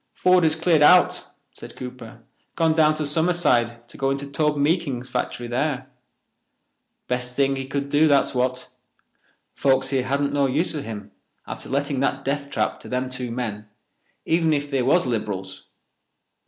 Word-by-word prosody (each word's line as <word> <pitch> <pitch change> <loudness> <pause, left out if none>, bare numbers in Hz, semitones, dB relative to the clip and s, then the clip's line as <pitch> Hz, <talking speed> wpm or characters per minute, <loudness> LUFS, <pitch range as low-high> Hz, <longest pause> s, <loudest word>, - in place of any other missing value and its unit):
"Ford 180 -1 +4
has 160 -1 +3
cleared 165 -1 +2
out," 180 +4 +5 0.3
said - - -12
Cooper, 125 -2 -9 0.3
"gone 165 -1 +2
down 155 -1 +4
to 155 0 -2
Summerside 145 -7 +1
to - - -14
go 135 0 +1
into 135 +1 -2
Tobe 150 +1 0
Meekins's 140 -4 0
factory 125 -1 -3
there. 130 +2 -2 1.2
Best 125 0 -2
thing 135 0 +2
he 135 0 -5
could 140 0 -3
do, 150 +2 +4
that's 140 -2 +3
what. 130 0 -1 0.8
Folks 135 0 +1
here 130 -2 0
hadn't 140 +1 0
no 140 -1 +2
use 150 +7 0
for 150 - -4
him 110 -5 -8 0.3
after - - -7
letting 140 0 -1
that 135 0 -1
death 140 +1 -2
trap 110 -6 -1
to - - -11
them 125 0 -2
two 125 -1 -5
men—even 115 +8 -3
if 145 0 -2
they 135 -2 +1
was 140 +7 +3
Lib'rals. 100 -5 -4
135 Hz, 160 wpm, -23 LUFS, 125-150 Hz, 1.2 s, out